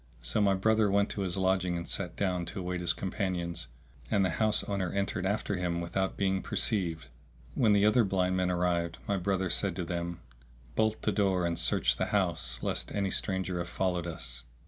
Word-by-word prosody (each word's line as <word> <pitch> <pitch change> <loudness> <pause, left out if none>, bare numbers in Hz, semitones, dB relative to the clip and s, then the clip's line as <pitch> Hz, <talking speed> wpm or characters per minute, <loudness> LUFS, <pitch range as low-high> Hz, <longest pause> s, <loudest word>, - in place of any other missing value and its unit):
So - - 0
my 100 -1 +4
brother 110 +2 +3
went 100 +1 +2
to 100 - -3
his 95 -1 -1
lodging 95 -2 +1
and 85 - -5
sat 90 -3 -3
down 90 -3 -1
to 100 - -5
await 90 -1 -3
his 85 - +2
companions, 90 - -2 0.4
and 100 -2 +3
the 95 - +1
house 110 -1 +4
owner 95 -3 -2
entered 100 -1 -1
after 100 -1 -1
him 85 -1 -1
without 95 +3 -2
being 95 -1 +1
perceived. 85 - -1 0.5
When 110 +1 +4
the 100 0 +4
other 115 +3 +5
blind 95 -2 +1
men 90 -1 +1
arrived, 85 -2 0
my 100 - +1
brother 95 0 0
said 95 -4 +2
to 90 - -3
them, 85 0 -4 0.5
"Bolt 110 0 +1
the - - +2
door 95 -4 +2
and 85 -1 -1
search - - +2
the - - +1
house 85 -11 0
lest - - -1
any 100 -2 0
stranger 95 -2 -1
have 85 0 -4
followed 90 -1 -1
us." 65 -7 -4
95 Hz, 195 wpm, -30 LUFS, 85-100 Hz, 0.5 s, other